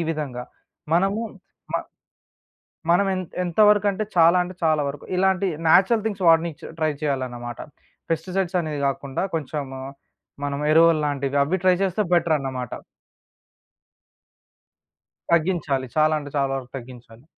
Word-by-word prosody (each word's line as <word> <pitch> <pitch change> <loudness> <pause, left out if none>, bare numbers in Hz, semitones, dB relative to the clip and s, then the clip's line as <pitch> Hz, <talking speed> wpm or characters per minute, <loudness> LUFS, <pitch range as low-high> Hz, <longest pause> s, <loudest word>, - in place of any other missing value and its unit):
విధంగా. 135 -6 -4 0.5
మనము 195 +5 +2 0.5
మ - - -4 1.2
మనం 195 +3 +3
ఎంత 185 -2 -5
ఎంతవరకంటే 205 +2 +3
చాలా 170 +1 +6
అంటే 180 +1 -8
చాలా 155 -2 +3
వరకు. 140 0 -6
ఇలాంటి 190 +1 +2 0.2
న్యాచురల్ 200 +6 +5
థింగ్స్ 200 -4 -2
వాడనిచ్చ 165 -2 +3 0.2
ట్రై 155 -1 +2
చేయాలన్నమాట. 125 -4 -3 0.5
పెస్టిసైడ్స్ 180 +3 -1
అనేది 150 -3 -4
గాకుండా 135 +3 -2
కొంచము 140 -3 -4 0.6
మనం 140 0 -3
ఎరువలు 165 0 +5
లాంటివి 140 -1 -1
అవి 180 +7 0
ట్రై 185 -1 +5
చేస్తే 190 +2 0
బెటరన్నమాట. 135 -7 0 2.6
తగ్గించాలి. 160 -6 +1
చాలా 155 0 +4
అంటే 145 -1 -8
చాలా 135 -1 +1
వరకు 130 -2 -7
తగ్గించాలి. 120 -1 -12
155 Hz, 115 wpm, -23 LUFS, 140-185 Hz, 2.6 s, చాలా